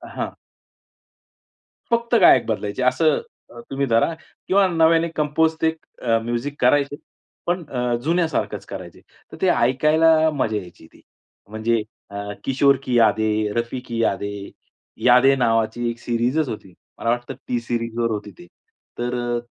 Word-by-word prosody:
हां. - - -2 1.6
फक्त 235 +1 +1
गायक 130 -9 +7
बदलायचे. 105 +1 -3
असं 155 +4 +2 0.3
अ, 120 - -11
तुम्ही 140 0 -1
धरा 115 +7 +2 0.3
किंवा 195 +1 +4
नव्याने 165 -1 +3
कंपोज 155 +2 +1
ते 160 - +4 0.5
म्युझिक 120 +4 -3
अ, - - -27
करायचे 140 +2 +3 0.5
पण 175 0 -1
अ, 125 -2 -1
जुन्यासारखंच 165 +1 -1
करायचे. - - -9 0.3
तर - - -10
ते - - +3
ऐकायला 155 +5 +4
मजा 120 -6 -1
यायची 90 -4 -10
ती. - - -22 0.5
म्हणजे 110 +1 0 0.3
अ, 100 - -8 0.3
किशोर 140 +1 +3
की 125 -2 0
यादे, 110 -1 +2
रफी 120 +3 -2
की 115 -1 -2
यादे, 100 -1 -2 0.6
यादे 125 +2 +6
नावाची 120 -1 +1
एक 115 0 -6
सीरीजच 125 +6 0
होती, 95 -4 -8 0.3
मला 115 - -1
वाटतं 120 +1 -1 0.2
T-Series 120 -1 -2
वर 115 -1 +1
होती 105 -1 -4
ती, 85 - -14 0.5
तर 120 +1 -2 0.2
अ, - - -2
120 Hz, 140 wpm, -22 LUFS, 115-150 Hz, 1.6 s, गायक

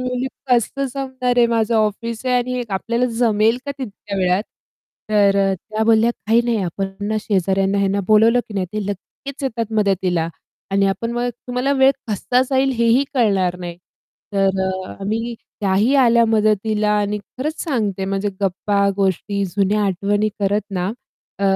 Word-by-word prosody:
बोलली 250 0 -2 0.2
कसं 250 +3 +2
जमणार 260 -2 -2
आहे. 240 - +6
माझं 230 -1 +1
ऑफिस 220 +2 -1
आहे 250 - +2
आणि 250 0 -1
आपल्याला 235 +6 0
जमेल 225 0 +3
का - - -2
तितक्या 205 -4 -6
वेळात? 185 +1 +2 0.7
तर 200 -2 +4
अ, - - +1
त्या 215 +4 -4
बोलल्या 225 +1 +4 0.2
काही 225 +2 +4
नाही 235 -1 +1
आपण 195 +3 -3 0.2
ना 215 - 0
शेजाऱ्यांना 195 0 +1
ह्यांना 200 0 +1
बोलावलं 225 +3 +5
की 215 - -9
नाही 190 -2 -1
ते 210 -1 -2
लगेच्च 270 +8 -7
येतात 230 -4 -2
मदतीला 185 -5 +1 0.4
आणि 195 0 +3
आपण 215 +4 -1
मग 240 +1 -1 0.2
तुम्हाला 250 +2 0
वेळ 265 -1 +5 0.2
कसा 235 +4 +1
जाईल 270 0 +2
हे 235 - +3
ही 250 +5 +4
कळणार 195 -7 +2
नाही. 175 -1 -6 0.6
तर 195 -1 +1
अ, 185 0 -3
आम्ही 225 +4 -2 0.3
त्याही 205 +6 +2
आल्या 235 -1 +5
मदतीला 215 -1 +1
आणि 205 0 -1
खरंच 275 +9 -5
सांगते 210 - -1
म्हणजे 195 +1 -1
गप्पा, 200 +1 +1
गोष्टी, 200 +1 0
जुन्या 200 +3 +1
आठवणी 200 +3 0
करत 205 +1 +2
ना 180 -2 -1 0.5
अ, - - -5
210 Hz, 160 wpm, -20 LUFS, 195-235 Hz, 0.7 s, आहे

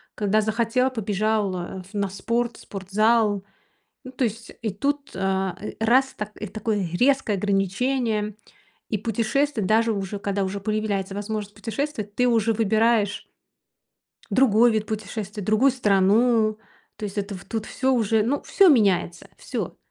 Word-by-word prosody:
Когда 210 +1 +2
захотел- 230 +4 +1
побежал, 210 -2 0
а, 180 +1 -6
в 190 +4 -19
на 200 -1 -1
спорт, 230 +5 -2
в - - -14
спортзал. 205 +1 +1 0.6
Ну, 255 - -8
то 260 0 -2
есть. 225 0 -3
И 225 - -1
тут, 280 +8 -2
э, - - -5
э, 190 +1 -2
раз, 265 +3 +3
та 210 0 -4
и 215 - -4
такое 205 -2 -2
резкое 255 +1 +2
ограничение. 210 +3 0 0.5
И 215 - 0
путешествовать, 230 +2 0
даже 225 +2 +3
уже 200 0 -4
когда 200 0 -1
уже 195 +1 -4
появляется 210 -2 -2
возможность 210 0 -4
путешествовать, 225 -3 -4
ты 250 - +3
уже 225 -2 +2
выбираешь 220 -1 +2 1.1
другой 235 0 +5
вид 215 -1 -1
путешествия, 210 -1 -5
другую 215 +7 +3
страну. 215 0 +3 0.4
То - - -7
есть 205 0 -4
это 200 0 -3
в 185 - -9
тут 220 -1 -4
всё 265 +1 0
уже, 225 -3 +2
ну, 265 +7 -1
всё 395 -2 +5
меняется, 195 - +2
всё. - - -5
215 Hz, 150 wpm, -24 LUFS, 200-230 Hz, 1.1 s, другой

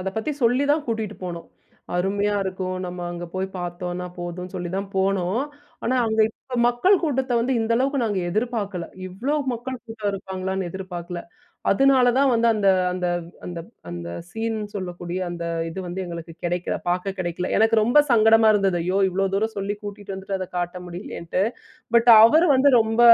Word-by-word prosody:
அத 185 - -2
பத்தி 220 +7 -1
சொல்லி 250 +4 +3
தான் 300 0 0
கூட்டிட்டு 220 -2 -2
போனோம். 170 -2 -6 0.5
அருமையா 200 +3 +1
இருக்கும் 185 -1 -3
நம்ம 180 0 -6
அங்கே 175 0 -6
போய் 190 0 -1
பாத்தோம்னா 175 0 -4
போதும் 175 +1 -5
சொல்லிதான் 190 +2 -3
போனோம். 190 +2 +1 0.4
ஆனா, 250 - +1
அங்கே 220 0 +3
இப்போ 250 +3 -8
மக்கள் 355 +11 +3
கூட்டத்த 265 -5 0
வந்து 250 +3 0
இந்த 225 +1 0
அளவுக்கு 275 +3 +1
நாங்க 205 -4 0
எதிர்பார்க்கல 205 -4 -2 0.2
இவ்ளோ 230 +11 -2 0.2
மக்கள் 245 +2 -5
கூட்டம் 220 -2 -3
இருப்பாங்களான்னு 190 -1 -3
எதிர்பார்க்கல. 175 -2 -6 0.5
அதுனால 260 +2 +5
தான் 275 -1 +4
வந்து 230 0 +3
அந்த 205 -2 +2 0.2
அந்த 180 0 -2 0.4
அந்த 175 -1 -5 0.3
அந்த 85 0 -6 0.2
சீன் 225 +3 -3 0.2
சொல்லக்கூடிய 180 -2 -4
அந்த 170 -1 -5 0.3
இது 175 - -7
வந்து 180 +2 -4
எங்களுக்கு 170 -1 -7
கிடைக்கல, 175 0 -1
பாக்க 180 +2 -1
கிடைக்கல. 180 0 -2
எனக்கு 225 +1 +4
ரொம்ப 240 +7 +4
சங்கடமா 225 -1 +6
இருந்தது. 195 -3 +2
ஐயோ! 185 +2 +1
இவ்வளோ 195 +1 0
தூரம் 220 +2 0
சொல்லி 200 +1 -2
கூட்டிட்டு 205 -1 -7
வந்துட்டு, 190 0 -4
அத 185 - -4
காட்ட 175 +1 -3
முடியலையேன்னுட்டு. 175 0 -3 0.5
பட் 235 +1 +4 0.2
அவரு 315 +9 +6
வந்து 275 +2 +5
ரொம்ப 225 +1 +1
195 Hz, 165 wpm, -23 LUFS, 180-230 Hz, 0.5 s, சங்கடமா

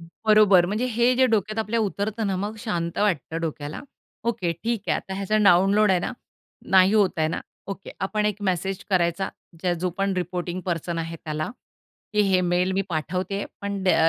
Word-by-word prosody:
बरोबर 200 +1 +4
म्हणजे 210 +6 -1
हे 240 +2 +3
जे 260 0 +5
डोक्यात 215 -2 0
आपल्या 220 +1 0
उतरतं 210 +1 -1
ना 195 - 0
मग 205 +4 -3
शांत 170 -6 -3
वाटतं 165 -6 0
डोक्याला. 155 -2 -4 0.4
ओके, 220 -7 0
ठीक 225 +5 -3
आहे. - - +3
आता 190 - -6
ह्याचा 200 +2 0
डाउनलोड 195 +3 +5
आहे 185 -2 +3
ना, - - -3 0.6
नाही 190 +1 +6
होताय 185 -7 +3
ना. - - -3 0.3
ओके, 195 0 -7
आपण 210 +2 0
एक 210 0 -2
मेसेज 185 +1 -2
करायचा 175 0 +1 0.3
ज्या 180 0 +1
जो 180 - +1
पण 195 0 +1
रिपोर्टिंग 180 0 -3
पर्सन 170 -1 -2
आहे 165 0 -4
त्याला, 155 0 -3 0.6
की 210 - +3
हे 190 -2 +3
मेल 180 +1 +1
मी 195 +1 +1
पाठवते 185 +4 -2 0.2
पण 200 -1 -3
द्या 165 -3 +5
190 Hz, 180 wpm, -24 LUFS, 175-210 Hz, 0.6 s, नाही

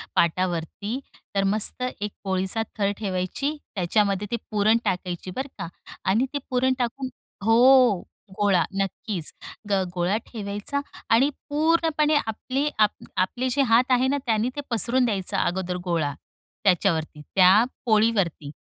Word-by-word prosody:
पाटावरती 180 - 0 0.4
तर 195 - +2
मस्त 220 +4 0 0.2
एक 210 - -2
पोळीचा 190 +3 -1 0.2
थर 200 -1 +1
ठेवायची 195 +9 -2 0.2
त्याच्यामध्ये 200 +2 +1
ते - - +1 0.2
पुरण 215 +2 +4
टाकायची 180 0 -2
बरं 265 +2 -3
का 170 -4 -4 0.4
आणि 225 +7 +3
ते 285 - 0
पुरण 260 +1 +2
टाकून 255 +2 -2 0.4
हो, 245 -2 +6 0.4
गोळा 195 -4 +4 0.2
नक्कीच 195 -3 -3 0.4
ग 195 -2 +2
गोळा 180 +4 +1
ठेवायचा 205 +4 -4 0.3
आणि 260 +5 +5 0.2
पूर्णपणे 310 0 +2
आपले 260 +6 -2
आप 210 -1 +6 0.3
आपले 240 +8 0
जे 280 - +2
हात 250 +3 +4
आहे 255 +1 +4
ना 285 +2 +1
त्याने 225 0 +1
ते 290 - -3
पसरून 245 +2 +2
द्यायचं 200 -5 -1
अगोदर 180 0 -1
गोळा, 165 -5 0 0.5
त्याच्यावरती 170 -5 +1
त्या 190 +3 +7 0.2
पोळीवरती. 210 - +1
210 Hz, 130 wpm, -25 LUFS, 185-250 Hz, 0.5 s, त्या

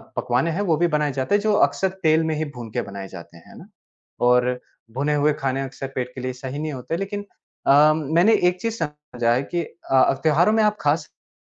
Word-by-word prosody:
पकवान 125 +7 0
हैं 180 +5 -2
वो 170 -6 +1
भी 175 +2 +2
बनाए 150 -2 0
जाते 135 +9 0
हैं, 205 - +2
जो 215 0 +1
अक्सर 190 - -1
तेल 160 0 +4
में 160 -1 -1
ही 155 +1 -2
भून 120 -2 -7
के - - -1
बनाए 100 -1 -7
जाते 85 -2 -12
हैं, 85 - -17
है - - -14
ना? 180 - -13 0.5
और 125 0 +3 0.3
भुने 140 +5 -1
हुए 150 +1 +3
खाने 135 -2 -2
अक्सर 135 0 -6
पेट 125 0 -3
के 130 - -6
लिए 130 0 -3
सही 130 +3 -6
नहीं 155 -1 -3
होते, 135 +6 -4
लेकिन 205 +1 -4 0.4
अ, 150 +2 +6
मैंने 165 +8 +3 0.2
एक 180 0 -6
चीज़ 230 -1 -2
समझा 145 -6 -2
है 130 - 0
कि 175 +4 -2
अ, 135 -6 +1
त्योहारों 165 +7 +4
में 220 0 +3
आप 210 0 +2
खा 145 +1 +3
सकते 160 -2 -14
150 Hz, 230 wpm, -22 LUFS, 130-170 Hz, 0.5 s, अ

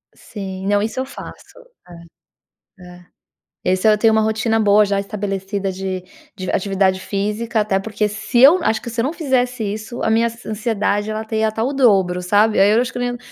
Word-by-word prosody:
Sim, 190 -2 -7
não, 205 0 +2
isso 225 +4 -3
eu 260 - -2
faço. 275 - -12 1.2
É. - - -13
É. 180 0 -17 0.6
Esse 185 +3 +1
eu 210 -1 +5
tenho 225 0 +4
uma 220 - +3
rotina 220 +1 0
boa 210 0 +4
já 200 0 0
estabelecida 195 -1 -3
de 185 0 -4 0.3
de 185 -1 -5
atividade 190 -1 +1
física, 210 +4 -2
até 205 -2 +1
porque 210 +1 -2
se 220 +4 -1
eu 295 +8 +8
acho 220 - +1
que - - -8
se 230 0 -3
eu 230 - 0
não 290 - -1
fizesse 250 -7 -1
isso, 215 +3 -5
a - - 0
minha 230 +1 +3
an 230 -1 -10
ansiedade 210 -1 -1
ela 215 0 -3
ia - - -6
até 220 0 -4
estar 220 +1 -2
o 270 - -1
dobro, 190 -8 +3
sabe, 210 +4 +2
aí 200 +2 +5
eu 225 +3 +4
acho 250 - -2
que - - -5
eu - - -2
nem 245 0 -1
não 245 - -7
215 Hz, 215 wpm, -19 LUFS, 195-230 Hz, 1.2 s, eu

